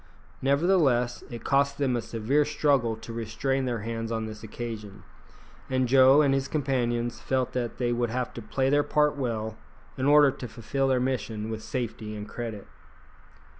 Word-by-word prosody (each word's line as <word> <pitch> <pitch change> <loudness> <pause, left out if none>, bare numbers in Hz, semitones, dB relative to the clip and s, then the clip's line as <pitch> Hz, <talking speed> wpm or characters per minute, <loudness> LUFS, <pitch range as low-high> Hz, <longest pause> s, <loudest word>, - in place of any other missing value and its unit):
Nevertheless, 135 -5 +2
it 120 -2 -8
cost 140 0 +2
them 135 -3 +1
a 120 - 0
severe 115 +6 +1
struggle 140 -6 +1
to 115 +1 -9
restrain 130 +4 -1
their 120 -3 -2
hands 115 +1 -4
on 110 -1 -1
this 110 -1 -8
occasion, 110 -2 -7 0.7
and 130 -1 +1
Joe 135 +3 +6
and 140 -2 +3
his 135 0 0
companions 120 -5 -1
felt 130 -2 -1
that 120 -2 -3
they 120 -1 0
would 120 -1 0
have 125 +1 -2
to 120 - -7
play 130 +4 0
their 145 0 +4
part 150 0 +2
well 110 -5 -3 0.4
in 130 - +1
order 145 -1 +7
to 125 - -7
fulfil 135 +5 -2
their 130 -1 +2
mission 115 -4 -2
with 110 -1 -4
safety 115 -4 -4
and 105 0 -6
credit. 110 -3 -6
125 Hz, 170 wpm, -27 LUFS, 115-135 Hz, 0.7 s, order